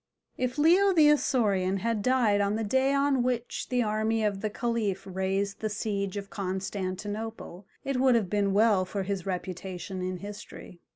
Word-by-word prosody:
If 255 +1 -2
Leo 365 +6 +5
the 310 -4 +6
Isaurian 200 -10 +1
had 230 -2 0
died 230 -4 +3
on 200 +1 +1
the 225 - -1
day 265 +6 +2
on 280 -2 +2
which 245 -1 -2
the 250 -1 +2
army 220 +1 0
of 200 -2 -1
the 215 - -1
Caliph 215 -4 -2
raised 195 +1 -2
the 215 - -2
siege 200 -2 -2
of 200 0 -6
Constantinople 195 +1 -4 0.2
it 275 -1 -1
would 260 -1 +4
have 220 -5 +1
been 200 +1 +1
well 205 -1 +4
for 195 +1 -3
his 195 -1 -3
reputation 185 0 -5
in 185 0 -3
history. 200 -2 -10
205 Hz, 170 wpm, -28 LUFS, 195-240 Hz, 0.2 s, the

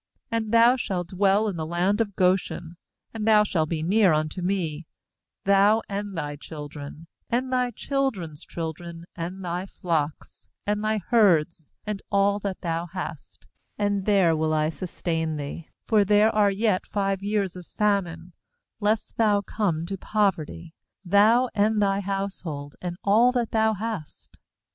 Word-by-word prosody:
10And 225 -1 -1
thou 230 +2 +6
shalt 180 -7 -3
dwell 195 +3 +2
in 195 -5 -3
the 160 - -2
land 180 +6 +1
of 205 -3 -2
Goshen, 180 -2 0 0.4
and 220 -1 -3
thou 215 -1 +6
shalt 160 -6 0
be 160 -2 -2
near 195 0 +4
unto 155 +3 -1
me, 170 -4 -2 0.6
thou, 200 +3 +4
and 200 -2 -4
thy 145 -2 -3
children, 150 0 -9 0.2
and 255 +2 -1
thy 250 -1 +2
children's 225 - -3
children, 165 +1 -6
and 180 +3 -5
thy 175 +2 -3
flocks, 160 -5 -3 0.2
and 210 +1 -1
thy 215 0 +1
herds, 170 - +3
and 210 -2 -3
all 200 0 +3
that 195 -2 -4
thou 170 -1 -2
hast; 170 -5 -8 0.3
nand 205 -2 0
there 190 -6 +4
will 155 0 0
I 155 0 +2
sustain 165 -2 -3
thee; 150 +2 -6 0.2
for 215 -3 +4
there 210 +2 +4
are 210 -1 +4
yet 200 -1 0
five 195 -1 -1
years 200 -2 -1
of 180 -2 -10
famine; 180 -5 -1 0.5
lest 210 0 -1
thou 210 -3 +3
come 180 -6 -1
to 195 +1 -5
poverty, 170 -6 -1 0.3
thou, 215 +7 +5
and 215 +1 +2
thy 200 -1 +2
household, 190 -7 -4
and 175 -1 -4
all 225 +5 +5
that 240 -3 -1
thou 220 -1 +2
hast. 210 -6 -6
195 Hz, 155 wpm, -25 LUFS, 165-210 Hz, 0.6 s, thou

